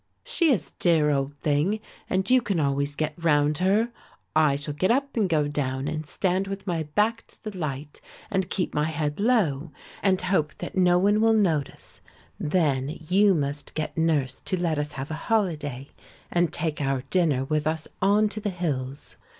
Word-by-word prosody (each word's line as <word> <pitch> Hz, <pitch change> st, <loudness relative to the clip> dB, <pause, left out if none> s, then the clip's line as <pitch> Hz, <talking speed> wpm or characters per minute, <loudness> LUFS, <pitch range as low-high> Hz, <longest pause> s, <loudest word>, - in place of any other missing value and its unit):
"She 360 Hz, -11 st, +2 dB
is 185 Hz, -, 0 dB
a -, -, -37 dB
dear 160 Hz, -4 st, +3 dB
old 140 Hz, 0 st, -1 dB
thing 155 Hz, +9 st, +1 dB, 0.3 s
and 190 Hz, +1 st, 0 dB
you 255 Hz, +1 st, +5 dB
can 200 Hz, -7 st, -1 dB
always 140 Hz, 0 st, 0 dB
get 155 Hz, 0 st, -1 dB
round 150 Hz, -1 st, +3 dB
her. 205 Hz, +6 st, +2 dB, 0.4 s
I 155 Hz, -3 st, +4 dB
shall 145 Hz, +1 st, -4 dB
get 185 Hz, +6 st, 0 dB
up 275 Hz, +3 st, +1 dB
and 210 Hz, -5 st, +1 dB
go 150 Hz, -3 st, +2 dB
down 135 Hz, -2 st, -2 dB
and 155 Hz, 0 st, -4 dB
stand 185 Hz, +4 st, 0 dB
with 195 Hz, 0 st, -5 dB
my 170 Hz, -4 st, -1 dB
back 210 Hz, +9 st, 0 dB
to -, -, -21 dB
the 215 Hz, -3 st, -6 dB
light 150 Hz, -3 st, -5 dB, 0.3 s
and 190 Hz, -3 st, 0 dB
keep 180 Hz, -, -1 dB
my 150 Hz, 0 st, +1 dB
head 150 Hz, -1 st, -2 dB
low, 175 Hz, -, +1 dB, 0.3 s
and 190 Hz, -2 st, +3 dB
hope 180 Hz, -5 st, 0 dB
that -, -, -7 dB
no 180 Hz, -1 st, +4 dB
one 205 Hz, +3 st, +3 dB
will 225 Hz, 0 st, +5 dB
notice; 170 Hz, -10 st, -1 dB, 0.4 s
then 150 Hz, -3 st, 0 dB
you 195 Hz, +1 st, +5 dB
must 145 Hz, -1 st, -3 dB
get 155 Hz, -1 st, -3 dB
nurse 150 Hz, -6 st, +1 dB
to 185 Hz, -, -2 dB
let 165 Hz, -4 st, 0 dB
us 150 Hz, 0 st, -3 dB
have 135 Hz, +3 st, -6 dB
a 160 Hz, +1 st, -6 dB
holiday 150 Hz, -, -1 dB, 0.4 s
and 175 Hz, -2 st, +2 dB
take 155 Hz, -2 st, -2 dB
our 135 Hz, -2 st, 0 dB
dinner 160 Hz, -8 st, +2 dB
with 155 Hz, +1 st, 0 dB
us 155 Hz, 0 st, -2 dB
on 205 Hz, +3 st, +4 dB
to 215 Hz, -, -5 dB
the 210 Hz, -1 st, -2 dB
hills. 145 Hz, -7 st, -4 dB
160 Hz, 190 wpm, -26 LUFS, 145-195 Hz, 0.4 s, you